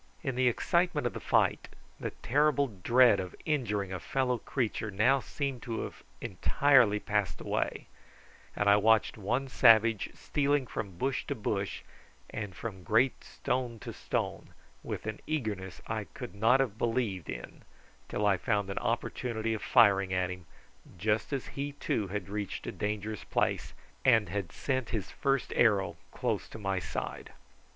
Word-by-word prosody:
In 135 -4 -1
the 125 +1 +2
excitement 170 +4 +1
of 120 - 0
the - - -5
fight - - +1 0.3
the - - -2
terrible 145 +2 +2
dread 115 +2 +4
of 90 -1 -5
injuring 105 - -1
a 95 - -3
fellow 125 +3 0
creature 110 -2 -2
now 110 +8 +3
seemed 135 -2 -4
to 115 -3 -3
have - - -7 0.2
entirely 125 -7 +3
passed 105 -7 -1
away, - - -2 0.7
and 105 - 0
I 100 0 +7
watched 110 +1 +3
one 125 +7 -1
savage 115 -4 +5
stealing 145 -2 +1
from 100 -6 -5
bush 135 +4 -1
to - - -1
bush, 100 -2 -2 0.5
and 105 -4 -5
from 100 -3 -6
great 115 +6 +2
stone 125 -2 -2
to - - -6
stone - - -3 0.3
with - - -5
an 110 0 -4
eagerness 105 -11 -3
I 110 -2 -3
could 125 +3 -8
not 115 +6 +4
have 110 -5 -2
believed 115 - -1
in - - -7 0.5
till 105 - -1
I 100 -2 +4
found 100 -1 0
an - - -2
opportunity 115 -2 -1
of 110 - -3
firing 100 -6 +5
at 90 -1 0
him, 90 -2 -9 0.5
just 105 - 0
as 135 -3 -2
he 140 +1 -3
too 110 -7 -1
had 100 -1 -4
reached 100 -1 -4
a - - -3
dangerous 105 0 -3
place - - -1 0.3
and 115 -6 +4
had 95 -3 -3
sent 130 - -2
his 110 -5 -3
first 135 -2 0
arrow 105 -5 +3 0.2
close - - -2
to - - -9
my 95 -3 -1
side. - - -5
110 Hz, 160 wpm, -30 LUFS, 100-130 Hz, 0.7 s, I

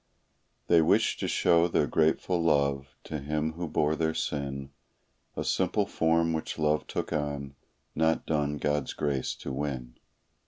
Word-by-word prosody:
They 85 -1 +5
wished 80 - +2
to - - -1
show 85 0 +3
their 80 -3 +2
grateful 80 +4 +1
love 70 -4 +2 0.2
to 75 - -5
Him 75 +2 -2
who 85 +1 -4
bore 75 0 +1
their 80 0 0
sin; 70 -2 -3 0.7
A - - -1
simple 95 +3 +1
form 80 -2 +1
which 80 - -3
love 75 -1 +1
took - - -3
on, 70 -2 -3 0.4
not 80 +1 +1
done 75 -2 0
God's 75 -1 -1
grace 70 -3 -1
to 70 - -6
win. 65 -4 -4
75 Hz, 150 wpm, -28 LUFS, 70-80 Hz, 0.7 s, They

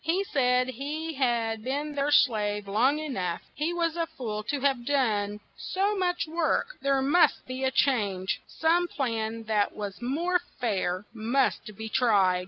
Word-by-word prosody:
He 340 +5 +1
said 250 -7 +2
he 295 +6 -4
had 235 -5 0
been 290 +4 -2
their 285 0 0
slave 210 -7 +2
long 245 +9 +3
e 310 0 -4
nough; 180 - -3
he 305 +3 -1
was 340 -2 0
a 335 -1 -1
fool 245 -10 -5
to 285 - -1
have 270 -3 +1
done 210 -7 0
so 400 +2 -1
much 360 -2 0
work: 335 +9 0
there 275 -1 +2
must 315 +6 +3
be 255 +1 -5
a 265 - +3
change; 205 -9 +1
some 340 +2 +2
plan 230 -6 -2
that 215 -2 0
was 205 0 -6
more 335 +9 +1 0.2
fair 190 -4 -1
must 230 -1 0
be 220 - -5
tried. 205 -6 +3
260 Hz, 165 wpm, -27 LUFS, 215-305 Hz, 0.2 s, long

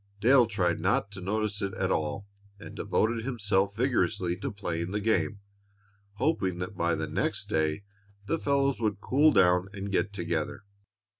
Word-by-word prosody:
Dale 120 +3 +5
tried 90 -6 0
not 95 +3 +1
to 100 -2 -8
notice 105 +2 -2
it 100 -1 -2
all, 80 +6 -1 0.3
and - - -10
devoted 115 +1 0
himself 105 -5 0
vigorously 110 -7 +1
to 100 - -4
playing 85 -4 -3
the 105 +2 -2
game, 105 -1 0 0.7
hoping 100 - 0
that 90 +3 -5
by 85 -2 +1
the 80 0 -2
next 75 - -2
day 80 +3 0 0.4
the 165 - -1
fellows 140 -2 +1
would 105 -3 0
cool 145 +8 +4
down 90 -3 +4
and 100 0 -5
get 100 - +1
together. 85 -2 -3
100 Hz, 155 wpm, -28 LUFS, 90-110 Hz, 0.7 s, Dale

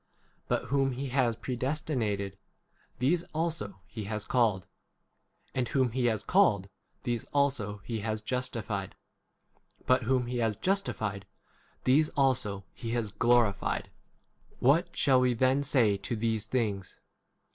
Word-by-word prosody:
But - - -1
whom 135 -1 +2
he 135 +2 -4
has 125 -3 +2
predestinated, 125 - -2 0.6
these 150 +8 +2
also 155 - -2
he 110 -3 -7
has 105 0 -3
called; 110 -8 +2 0.9
and 125 -2 0
whom 130 -2 +1
he 125 +1 0
has 110 -2 0
called, 110 - +3 0.3
these 120 -3 -1
also 125 -8 0
he 115 -2 -3
has 110 0 -3
justified; 110 -5 -3 0.9
but 130 +1 +4
whom 125 +1 +1
he 120 0 -3
has 110 -3 +1
justified, 110 - -1 0.6
these 150 +4 +4
also 125 -8 +1
he 115 -2 -5
has 115 -4 -1
glorified. 115 -3 +2 0.6
81 - - -28
What 165 +7 +3
shall 130 -3 +4
we 125 -1 +2
then 130 +3 +3
say 125 -8 +3
to 120 - -3
these 110 -1 -1
things 105 -6 -2
120 Hz, 135 wpm, -30 LUFS, 105-135 Hz, 0.9 s, but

